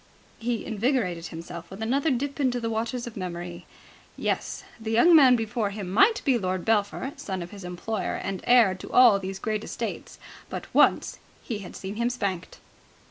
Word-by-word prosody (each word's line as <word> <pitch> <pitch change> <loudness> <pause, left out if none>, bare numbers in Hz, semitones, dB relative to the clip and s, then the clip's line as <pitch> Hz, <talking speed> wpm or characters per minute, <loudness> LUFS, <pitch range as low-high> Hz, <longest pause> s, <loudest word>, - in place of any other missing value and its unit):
He 235 0 -2
invigorated 215 -7 -1
himself 170 0 -8
with 190 - -9
another 270 +8 +1
dip 280 +2 -2
into 255 -3 +1
the 230 -1 -2
waters 235 +2 -2
of 240 - -8
memory. 175 -2 -6 0.5
Yes. - - -2 0.2
The 220 -1 -5
young 240 +10 +6
man 265 -5 +8
before 225 -2 -1
him 200 -3 -6
might 395 - +4
be 260 -4 +3
Lord 185 -2 -2
Belpher, 225 +5 0
son 190 -3 -4
of 170 - -10
his 200 -2 -10
employer 180 +3 -3
and 195 -1 -4
heir 240 -6 +6
to 185 - -9
all 240 -5 +7
these 190 0 -5
great 215 +1 -2
estates, - - -5 0.3
but - - -5
once - - +3 0.2
he 220 -4 -4
had 195 - -9
seen 195 +2 -6
him 235 +1 +1
spanked. 200 -8 -3
220 Hz, 180 wpm, -26 LUFS, 185-245 Hz, 0.5 s, man